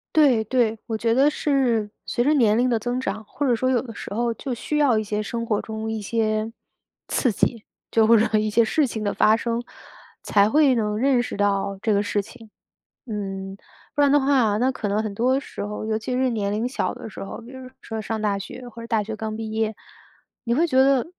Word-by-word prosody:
对， 265 -8 +5
对， 225 -1 +1
我 225 -2 -3
觉 230 +1 +1
得 270 +4 +5
是 255 -8 +1
随 240 - 0
着 295 +4 +3
年 220 -6 +4
龄 250 +1 +2
的 235 -2 +1
增 245 +3 -2
长， 215 -2 -4
或 290 - -3
者 255 - +3
说 255 +3 +1
有 250 -3 +2
的 235 -3 -9
时 200 - -7
候 235 +2 0
就 255 +3 -5
需 300 +5 -3
要 280 -6 +4
一 215 - 0
些 210 0 -2
生 230 +2 -4
活 210 -3 0
中 220 0 -5
一 220 -1 -3
些 215 +1 -1 0.6
刺 250 -5 +1
激， 230 +2 0 0.3
就 220 -1 +4
会 230 - +7
让 215 0 +3
一 215 0 0
些 230 +2 +4
事 280 +6 +2
情 220 -3 -4
的 205 - 0
发 215 - +4
生， 230 +1 -2 0.6
才 205 0 +3
会 290 0 +4
能 210 -3 0
认 260 +1 +3
识 245 - -5
到 200 -1 0
这 220 -1 +1
个 200 - +3
事 205 0 0
情。 225 +2 -14 0.6
嗯， 195 -3 -5 0.4
不 290 - +1
然 285 - +5
的 290 - +6
话 260 -6 +3
那 255 +4 +2
可 220 - -4
能 205 +2 0
很 215 -2 -4
多 250 +5 +2
时 - - -8
候， 210 +1 -5
尤 220 0 -1
其 235 +3 -4
是 255 +1 +2
年 210 -4 -1
龄 215 +3 -1
小 260 - -2
的 245 -2 -8
时 - - -9
候， 195 - -7
就 235 +2 -12
是 260 -1 -9
说 225 -1 -5
上 220 +1 -3
大 205 -2 0
学， 245 +5 -8
或 230 0 -11
者 230 - -8
大 220 -2 +1
学 215 +1 -6
刚 220 0 -4
毕 220 0 -5
业， 220 0 -1 0.7
你 235 - +1
会 315 +7 +3
觉 260 -6 0
得 265 -1 +4
225 Hz, 255 characters per minute, -23 LUFS, 215-250 Hz, 0.7 s, 会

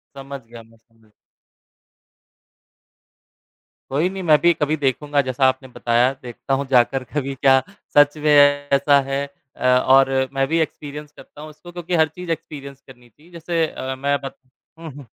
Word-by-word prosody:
समझ 140 0 -8
गया 115 -1 -12
मैं, 115 0 -23
समझ 115 -1 -30 2.8
कोई 150 +7 0
नहीं 190 0 -7
मैं 155 -3 +5
भी 170 0 +4
कभी 150 0 -1
देखूँगा 145 +1 0
जैसा 130 0 -1
आपने 130 0 -2
बताया 120 +1 +1
देखता 125 +2 -5
हूँ 140 +1 0
जाकर 130 +1 +2
कभी 140 -2 -3
क्या 135 0 +4 0.4
सच 145 +1 +5
में 150 0 -1
ऐसा 145 0 +4
है 140 +1 -1 0.3
अ, - - -10
और 130 +1 +4 0.2
मैं 135 0 0
भी 165 +1 0
एक्सपीरियंस 150 -1 -5
करता 150 - -15
हूँ 155 - -9
उसको 175 +3 -14
क्योंकि 175 0 -4
हर 160 -1 +3
चीज़ 175 +3 -8
एक्सपीरियंस 140 -4 -7
करनी 125 -2 -17
चाहिए 150 +10 -23
जैसे 170 -1 -2
अ, 130 -2 -6
मैं 140 +2 0
बत 135 0 -7 0.4
हुँ, 165 -2 -8
हुँ। 140 -1 -12
140 Hz, 165 wpm, -20 LUFS, 130-150 Hz, 2.8 s, मैं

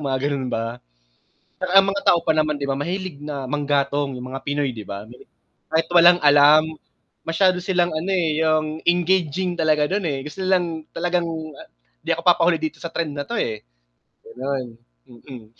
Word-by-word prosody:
mga 135 -3 -1
gano'n 135 -2 -2
ba. 115 +1 -3 1.0
Ang 195 0 +7
mga 200 - -2
tao 170 - +5
pa 160 -2 +1
naman 155 -1 0
'di 140 - -3
ba, 135 - 0
mahilig 180 +1 -4
na 140 -3 -5
manggatong 145 0 0
yung 125 - -7
mga 135 - -6
Pinoy 145 -3 -1
'di 110 - -7
ba, 100 +2 -7 0.6
kahit 160 0 +1
walang 175 +1 +7
alam 145 +1 +6 0.6
masyado 180 +2 +2
silang 180 -2 +1
ano, 175 +5 -2
eh, 160 -4 +1
yung 155 0 0
engaging 175 0 +1
talaga 155 -2 +2
dun, 200 +1 -1
eh, 135 -3 -3
gusto 190 +5 -7
lang 175 -4 0
talagang 175 0 -1 0.8
'di - - -1
ako - - -7
papahuli 170 0 +4
dito 155 -1 -4
sa 170 - -5
trend 160 -4 -2
na 145 - -3
'to, 235 - -4
eh, 110 -2 -3 0.6
gano'n, 130 0 -4 0.4
mm. 120 -1 -12
155 Hz, 170 wpm, -22 LUFS, 140-175 Hz, 1.0 s, Ang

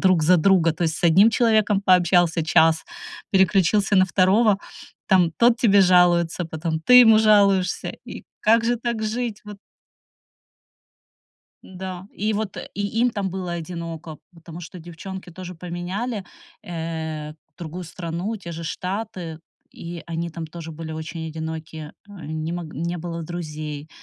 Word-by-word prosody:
друг 185 -4 +3
за 180 +4 +5
друга. 170 -1 +3
То 160 - -5
есть 160 -1 -1
с - - -4
одним 190 +7 +6
человеком 215 -4 +2
пообщался 175 -3 +3
час, 160 0 +3 0.5
переключился 195 0 +3
на 185 - +6
второго, 195 +3 +3 0.5
там 185 -4 +4
тот 235 0 +4
тебе 205 -4 +4
жалуется, 180 -2 +3
потом 160 0 -3
ты 250 +9 +8
ему 225 -3 +7
жалуешься. 200 -4 +3 0.2
И - - -9 0.2
как 225 +2 +3
же 240 +1 +1
так 235 -1 -3
жить? 220 0 -3
Вот 210 -1 -10 2.1
Да. 185 0 -8
И 215 +2 -1
вот, 205 -2 -3 0.2
и 205 0 -2
им 245 +1 +3
там 200 -4 -3
было 185 -1 -4
одиноко, 165 -2 -6 0.2
потому 165 0 -11
что 175 +2 -10
девчонки 175 +3 -9
тоже 180 +1 -9
поменяли, 180 +6 -4 0.4
э, 160 -2 -5 0.2
другую 175 +2 -7
страну, 170 +6 -5
те 175 -4 -8
же 165 0 -7
Штаты, 180 -2 -5 0.3
и 170 0 -8
они 170 0 -3
там 165 0 -7
тоже 165 0 -9
были 160 0 -7
очень 160 +1 -6
одиноки. 160 -1 -6 0.2
Не 160 -5 -6
мог 175 -1 -4
не 170 +4 -3
было 170 0 -5
друзей, 155 -3 -6
175 Hz, 145 wpm, -23 LUFS, 165-200 Hz, 2.1 s, ты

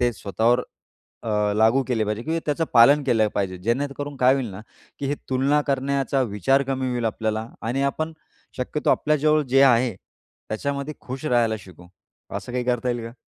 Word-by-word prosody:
ते 120 -1 +2
स्वतःवर 115 +5 +1 0.6
अ, 105 -1 +1
लागू 110 +5 +4
केले 115 -4 +1
पाहिजे? 105 +2 -3
किंवा 160 +3 -1
त्याचं 155 +2 0
पालन 140 +6 +7
केलं 115 -5 +2
पाहिजे, 95 -2 -1
जेणेकरून 140 +7 -2
काय 130 0 +4
होईल 130 -5 -2
ना 95 +2 -8 0.4
की 140 - -3
हे 145 - 0 0.2
तुलना 135 +3 +2
करण्याचा 135 -1 0
विचार 125 +5 +1
कमी 130 -1 -2
होईल 120 -1 -2
आपल्याला 110 0 -2 0.2
आणि 120 +5 -1
आपण 155 +4 -1 0.5
शक्यतो 135 +4 -1
आपल्या 150 0 +2
जवळ 155 +1 +3
जे 135 +2 +5
आहे, 125 -3 +4 0.5
त्याच्यामध्ये 140 +6 -3
खुश 130 +3 -7
राहायला 120 -5 +2
शिकू. 90 -3 -15 0.4
असं 125 - -6
काही 125 0 -1
करता 125 0 0
येईल 120 -1 -2
का? 115 - -10
125 Hz, 175 wpm, -23 LUFS, 110-140 Hz, 0.6 s, पालन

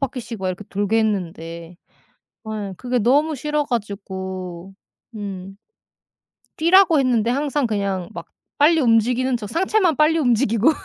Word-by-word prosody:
바퀴씩 245 -5 -4
막 185 - -1
이렇게 185 +3 -5
돌게 205 +3 0
했는데 170 -5 -3 0.7
아 210 -3 -5
그게 250 +2 -1
너무 290 +7 +2
싫어 300 +2 -1
가지고 190 -5 -5 0.4
음. 195 -2 -7 1.0
뛰라고 340 -1 +5
했는데 240 -4 +2
항상 285 -1 0
그냥 200 -4 -2
막 170 -2 -7 0.3
빨리 315 +2 +4
움직이는 245 +2 +2
척 210 -3 -7
상체만 370 - +2
빨리 310 +2 +4
움직이고 240 -1 +3
225 Hz, 275 characters per minute, -21 LUFS, 195-280 Hz, 1.0 s, 뛰라고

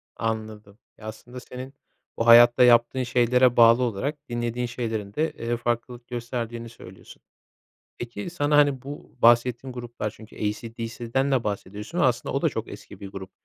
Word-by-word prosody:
Anladım. 110 -2 -5 0.2
Ya, 110 - -10
aslında 120 +3 -9
senin 130 +2 -9 0.4
bu 115 - -1
hayatta 120 +1 +8
yaptığın 120 +1 +4
şeylere 125 +1 +3
bağlı 115 +1 +6
olarak 125 +6 -2
dinlediğin 120 +1 -2
şeylerin 115 -4 -4
de, 155 +5 0
eee, 120 +1 -3
farklılık 120 +1 -3
gösterdiğini 120 -1 -5
söylüyorsun. 95 -5 -14 0.8
Peki 120 +3 -6
sana, 145 -3 +1
hani, 145 -3 +3
bu 145 +2 -10
bahsettiğin 120 +2 +3
gruplar, 120 -3 -5
çünkü 110 +1 -15
AC/DC'den 115 +4 -3
de 130 -3 +1
bahsediyorsun 105 - -5
ama 145 - +4
aslında 120 -1 -3
o - - -1
da - - +4
çok - - -5
eski - - -11
bir 100 - -7
grup, 95 -1 -9
120 Hz, 155 wpm, -25 LUFS, 115-125 Hz, 0.8 s, hayatta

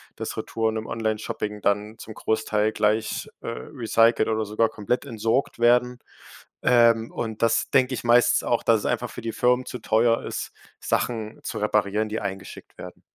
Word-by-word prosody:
dass - - -5
Retouren 110 -1 -2
im 110 - -5
Onlineshopping 110 -2 -3
dann 105 +2 -1
zum 110 - -9
Großteil 110 -1 0
gleich, 110 +1 0
äh, - - -9
recycelt 115 -2 +1
oder 110 0 0
sogar 110 +2 +1
komplett 110 +3 -2
entsorgt 115 +3 -1
werden. 125 +1 +3 0.6
Ähm, 115 -2 +4
und 110 -2 -4
das 115 - +2
denke 130 -1 +3
ich - - -4
meistens 120 +1 +4
auch, 120 - 0
dass 115 -1 +4
es - - -7
einfach - - -1
für - - -9
die 115 0 -3
Firmen 125 +2 +1
zu 125 - -6
teuer 115 +1 +2
ist, - - -5 0.3
Sachen 110 -2 -2
zu 110 - -5
reparieren 105 0 0
die 110 - -2
eingeschickt 95 -1 -7
werden. - - -10
110 Hz, 170 wpm, -24 LUFS, 110-120 Hz, 0.6 s, Ähm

